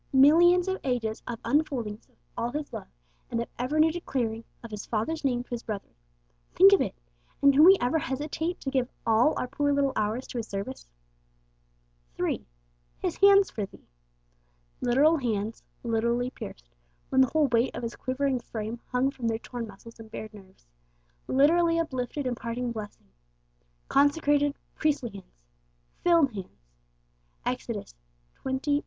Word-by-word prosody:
Millions 345 +7 +6
of 380 0 -1
ages 235 -4 -1
of 235 - -3
unfoldings 255 -8 -1
of - - -31 0.2
all 235 +1 -2
His 295 +2 -5
love, - - -6 0.4
and 230 - -1
of 235 - -2
ever 265 +5 0
new 320 +1 +5
declarings 240 -9 -3 0.2
of 230 - -9
His 210 -2 -5
Father's 270 +9 -2
name 245 -3 +1
to - - -32
His 240 -1 -3
brethren. 210 -5 -6 0.6
Think 195 +1 +8
of 200 - +5
it! - - -2 0.4
and 280 0 +6
can 290 +3 +6
we 380 +3 +9
ever 275 +7 +1
hesitate 305 +6 -3
to 270 - -3
give 255 -2 0 0.2
all 230 +6 +4
our - - -1
poor 285 +2 0
little 280 -1 +2
hours 215 +5 -1
to 245 - -3
His 225 - -5
service? 195 - -5 1.3
3. - - -1 0.5
His - - -3
Hands 400 0 +7
'for 205 -3 -3
thee.' - - -18 1.0
Literal 280 +7 +4
hands; 225 -4 -2 0.2
literally 235 +2 0
pierced, - - -9 0.4
when 265 - +4
the 260 - +5
whole 310 -1 +3
weight 235 +1 +2
of - - -5
His 230 0 -4
quivering 260 0 -1
frame 225 0 -5
hung 255 +2 +1
from 245 -4 -4
their 225 -1 0
torn 240 0 -6
muscles 225 +3 -13
and 225 -1 -11
bared 215 0 -7
nerves; 190 - -16 0.6
literally 330 +5 +4
uplifted 275 -3 -2
in 250 - 0
parting 240 +1 -3
blessing. 215 -3 -8 0.8
Consecrated, 290 0 +3 0.2
priestly 285 -6 0
hands; 195 - -13 0.6
'filled' 335 -7 +4
hands 185 - -9 0.8
(Ex. - - -2
xxviii. - - -4
250 Hz, 160 wpm, -28 LUFS, 225-290 Hz, 1.3 s, we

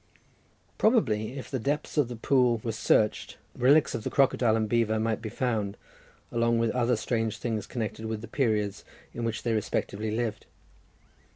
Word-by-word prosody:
Probably 130 - +2
if 135 - -8
the 130 - -1
depths 145 +6 -2
of 145 -5 +3
that 120 -2 -9
pool 125 -4 +3
were 115 - -1
searched, 110 0 +1 0.2
relics 140 +5 +4
of 115 - -4
the - - -2
crocodile 130 -5 +3
and 110 -1 +1
the - - -7
beaver 110 -1 +2
might 110 0 -1
be 110 - -5
found, 105 -4 -2 0.5
along 115 0 +2
with 115 -1 +1
other 125 -1 +1
strange 115 0 -1
things 110 -4 -3
connected 110 -2 -4
with 110 -1 -3
the 115 - -8
periods 110 -5 0 0.3
in 120 - -3
which 115 -1 -3
they 115 - 0
respectively 110 0 -2
lived. 110 -1 -3
115 Hz, 175 wpm, -28 LUFS, 110-125 Hz, 0.5 s, relics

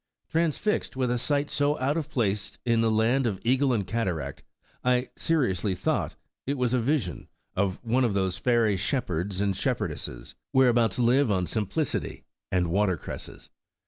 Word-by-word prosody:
Transfixed 165 +3 0
with 130 -2 0
a 120 - 0
sight 145 +3 0
so 145 +1 +1
out 135 +3 0
of 155 -2 -2
place 105 -7 -1
in 115 -2 +3
the 115 - +3
land 115 +4 +2
of 105 - 0
the - - -9
eagle 130 +2 +3
and 105 -5 0
cataract, 90 - -2 0.4
T 125 0 +2
seriously 105 - +1
thought 90 - -1 0.3
it 140 +1 0
was 125 -1 +1
a 125 - +3
vision 115 - -1 0.3
of: 95 -1 0
*One 125 +2 +2
of 110 -5 +1
those 95 -2 0
fairy 115 -5 +3
shepherds 95 -2 -1
and 100 -1 +1
shepherdesses, - - -3 0.2
Wlio 130 -2 +6
hereabout 115 -5 +2
live 125 +2 +3
on 95 -3 +1
simplicity 110 - -2 0.3
and 90 -2 +1
water 95 -1 +2
cresses.' - - -9
115 Hz, 170 wpm, -27 LUFS, 95-130 Hz, 0.4 s, Wlio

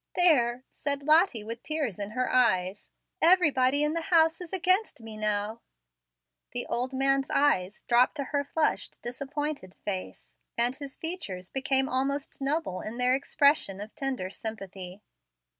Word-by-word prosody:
"There," 255 -9 +3
said 280 -1 -2
Lottie 310 - +4
with 230 +2 -6
tears 290 - -2
in 200 0 -3
her 255 +3 -1
eyes, 195 -6 +2 0.3
"everybody 290 -6 +4
in 300 +1 +1
the 335 - -1
house 325 -1 +3
is 350 - -8
against 370 - +1
me 220 -1 -9
now." 215 +1 -2 0.9
The - - 0
old 250 +2 -2
man's 270 +1 +2
eyes 205 -9 +1
dropped 245 +3 +4
to 285 - -2
her 285 +1 -1
flushed, 305 +2 -1
disappointed 275 -4 -4
face, 190 -3 -5 0.3
and 240 +2 +4
his 280 -1 -9
features 200 - -4
became 265 0 +3
almost 275 +2 -2
noble 275 - -1
in 220 +2 -6
their 250 0 +3
expression 275 -7 +2
of 210 +2 -8
tender 260 -9 -3
sympathy. 195 -3 -7
260 Hz, 145 wpm, -28 LUFS, 215-295 Hz, 0.9 s, Lottie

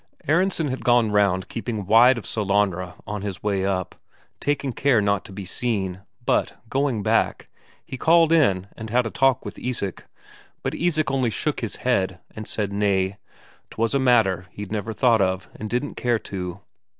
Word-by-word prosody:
Aronsen 165 0 +2
had 130 - -4
gone 120 -3 +4
round 100 -2 +2
keeping 115 -3 -4
wide 115 +5 +6
of 115 - -6
Sellanraa 100 -4 0
on 105 0 -4
his 100 -2 -5
way 100 -2 0
up, 95 -2 -2 0.5
taking 140 -2 -1
care 135 -1 +3
not 100 -2 +1
to - - -11
be 95 0 -7
seen; 95 -3 -2 0.2
but, - - +1
going 135 -6 0
back, - - +1 0.4
he 130 - -7
called 165 +1 +5
in 100 - +3
and 110 -1 -7
had 120 +2 +2
a 115 - -3
talk 135 -2 +2
with - - -7
Isak. 115 -7 -4 0.6
But - - -2
Isak 155 -5 0
only 130 -3 +1
shook 150 +6 -2
his 115 - -4
head 95 -8 +1 0.2
and 110 -1 -7
said 100 -2 -3
nay, 100 -1 +1 0.5
'twas 115 +2 -1
a 140 - +3
matter 110 -9 +3
he'd 105 -1 -8
never 110 0 -2
thought 115 -1 +3
of, 95 -1 -1
and 110 - -6
didn't 125 +5 -2
care 120 -1 +1
to. 95 -3 -6
110 Hz, 175 wpm, -23 LUFS, 95-125 Hz, 0.6 s, wide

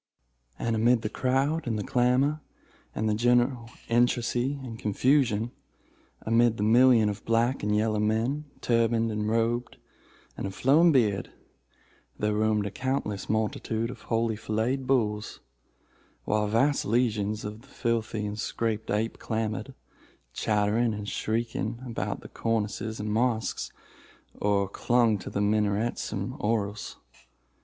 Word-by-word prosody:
And 115 -1 -1
amid 115 +1 +3
the 105 - -1
crowd, 135 +6 0
and 110 -2 0
the 105 - -2
clamor, 130 +5 +2 0.5
and 110 - 0
the 105 - +2
general 120 +1 +2 0.2
intricacy 120 +3 +1
and 115 -3 -7
confusion—amid 115 -1 0
the 105 - -1
million 120 0 +5
of 100 0 -4
black 115 +3 +1
and 105 0 0
yellow 110 0 +1
men, 115 +8 0 0.2
turbaned 115 -1 +2
and 105 0 -1
robed, 115 +2 0 0.6
and - - -4
of 95 - -7
flowing 160 +6 +5
beard, 105 -9 +1 0.9
there 105 0 0
roamed 105 -1 +1
a 100 - -3
countless 130 -5 -3
multitude 110 +1 -1
of - - -11
holy 115 -1 +1
filleted 115 +5 -1
bulls, 105 -5 0 0.9
while 105 0 +1
vast 135 +7 +2
legions 110 -2 0
of 105 +2 -6
the 135 - -20
filthy 115 -5 -2
but 105 +1 -5
sacred 110 -2 -2
ape 110 +2 -1
clambered, 110 +3 -3 0.6
chattering 105 +2 +1
and 105 0 -5
shrieking, 115 0 -2
about 120 -2 -3
the - - -10
cornices 110 0 -2
of 105 - -4
the 105 - -2
mosques, 115 0 0 0.6
or 100 -1 +1
clung 115 +1 +2
to - - -7
the 100 - -2
minarets 105 +2 0
and 100 +3 -3
oriels. 105 -2 -2
115 Hz, 135 wpm, -27 LUFS, 105-120 Hz, 0.9 s, million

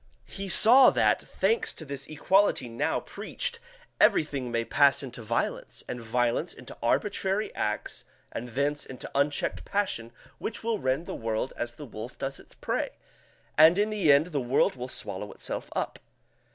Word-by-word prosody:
He 195 0 -6
saw 245 +8 +8
that, - - +2
thanks 455 0 0
to 160 - -9
this 140 -1 -6
equality 190 0 +2
now 115 0 -1
preached, 480 -1 -4 0.4
everything 140 -5 +3
may 115 0 0
pass 140 +1 +4
into 125 -3 -7
violence, 115 +1 -2
and 125 - -5
violence 120 +7 0
into 125 - -11
arbitrary 195 - 0
acts 105 0 -3 0.3
and 120 - -5
thence 145 +4 0
into 130 - -9
unchecked 140 +1 0
passion 185 - -2 0.3
which 225 - -4
will 225 -2 0
rend 130 +5 0
the - - -5
world 115 +2 -2
as 120 0 -4
the 145 - -9
wolf 115 0 -8
does 135 0 -4
its - - -16
prey, - - -2 0.7
and 160 +3 +8
in 210 +1 +2
the 195 -8 +3
end 140 +2 +5
the 145 -3 0
world 125 +2 +2
will 125 0 -5
swallow 105 -4 -2
itself - - -5
up. - - -2
140 Hz, 165 wpm, -28 LUFS, 120-190 Hz, 0.7 s, saw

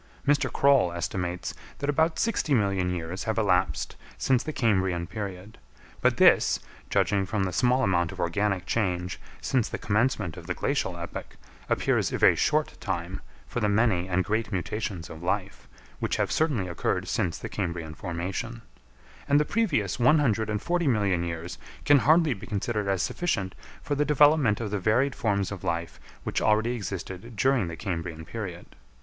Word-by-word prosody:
Mr. 145 -1 +3
Croll 140 -10 +4
estimates 90 0 -3 0.2
that 140 - -3
about 160 +3 +2
sixty 200 -10 +1
million 100 -4 +1
years 90 +2 -4
have 110 0 -1
elapsed 100 -5 +1 0.2
since 130 -3 +2
the 155 - -4
Cambrian 95 - +1
period, 100 +1 -7 0.4
but - - +3
this, - - +5 0.3
judging 100 -1 +2
from 100 +1 -1
the 95 -2 -2
small 125 +5 +3
amount 85 -5 +2
of - - -10
organic 95 +1 0
change 90 -4 -1 0.2
since 125 -4 +1
the - - -3
commencement 105 -5 0
of - - -10
the - - -2
Glacial - - -1
epoch, - - -7 0.3
appears - - +1
a - - -1
very - - +6
short 155 0 +1
time 95 0 -3 0.2
for - - -4
the 105 -3 +1
many 100 -4 +2
and 95 +1 +2
great 110 +2 -1
mutations 95 -2 -3
of 80 - -10
life, 95 +2 -2 0.3
which - - -1
have - - 0
certainly 140 - +1
occurred 85 - -1
since 85 - -1
the - - -6
Cambrian 85 -5 -4
formation; 95 +8 -4 0.7
and 145 +1 +5
the 150 - +2
previous 145 - 0
one 130 +6 +5
hundred 110 -7 +1
and 105 -1 -2
forty 175 -2 +1
million 100 -8 +2
years 85 0 -5 0.3
can 145 -1 +6
hardly 155 +1 +4
be 100 - -10
considered 105 0 -2
as 95 -2 +1
sufficient 100 - -1 0.3
for 145 - -2
the 145 +1 +2
development 150 -6 +4
of 110 -3 -3
the 105 - -1
varied 120 +8 +2
forms 100 -5 0
of 100 -3 -6
life 85 0 -3 0.2
which - - -1
already 110 +2 +3
existed 100 0 -5
during 130 -3 +2
the 85 - -5
Cambrian 85 -4 -4
period. 95 -6 -6
105 Hz, 170 wpm, -27 LUFS, 90-125 Hz, 0.7 s, very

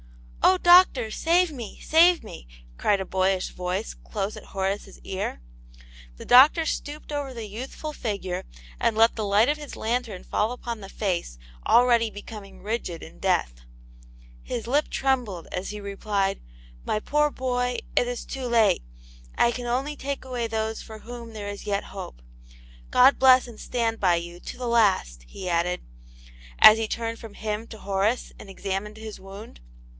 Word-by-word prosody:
" - - -16
Oh, 185 - +2
doctor, 350 - +6
save 340 +6 +2
me, 240 -7 -8
save 340 +2 +5
me! - - -10 0.3
cried 205 -1 +2
a 190 - -3
boyish 190 0 0
voice 180 +4 -3
close 205 -1 -4
at - - -11
Horace's 195 +1 -3
ear. 190 - -4 0.8
The - - -10
doctor 285 +6 +7
stooped 300 0 -4
over 285 -2 -3
the 230 -2 -5
youthful 260 +8 -6
figure, 200 -8 -3 0.4
and 220 - +1
let 225 +1 +5
the 220 - -2
light 205 +3 +4
of 295 +1 +1
his 295 -2 -9
lantern 230 -4 -2
fall 215 +2 0
upon 235 -3 -5
the 195 - -9
face 180 - -2 0.3
already 235 -2 +5
becoming 205 -1 -10
rigid 205 -6 -3
in 160 - -12
death. - - 0 0.8
His 230 - -5
lip 285 +6 +1
trembled, 245 -10 -1
as 180 - -3
he 210 - -6
replied, 200 -1 -2 0.2
" - - -23
My 215 - +1
poor 295 +6 +1
boy, 250 -2 -1 0.2
it 245 - +3
is 245 -1 -4
too 265 -2 -5
late. 230 - +3 0.6
I 235 - +4
can 245 0 -5
only 270 +5 -1
take 280 -1 -5
away 245 -3 -2
those 220 0 -2
for 220 -1 -10
whom 235 0 -9
there 210 -2 -6
is 205 +1 -7
yet 200 -1 -1
hope. - - -9 0.7
God 260 +3 +6
bless 255 -1 +6
and 230 -3 -12
stand 230 -2 -1
by 180 -3 +4
you 170 +1 -5
to - - -8
the 250 -1 -4
last! 195 - +2
" - - -23
he 185 - -7
added, 175 +1 0 0.8
as 215 +1 +9
he 225 - -1
turned 230 +1 -3
from 225 -3 -11
him 215 +1 -4
to 220 - -10
Horace 200 +4 -1
and 195 - -11
examined 195 +2 -4
his 220 -1 -8
wound. 195 - -11
220 Hz, 175 wpm, -25 LUFS, 195-245 Hz, 0.8 s, as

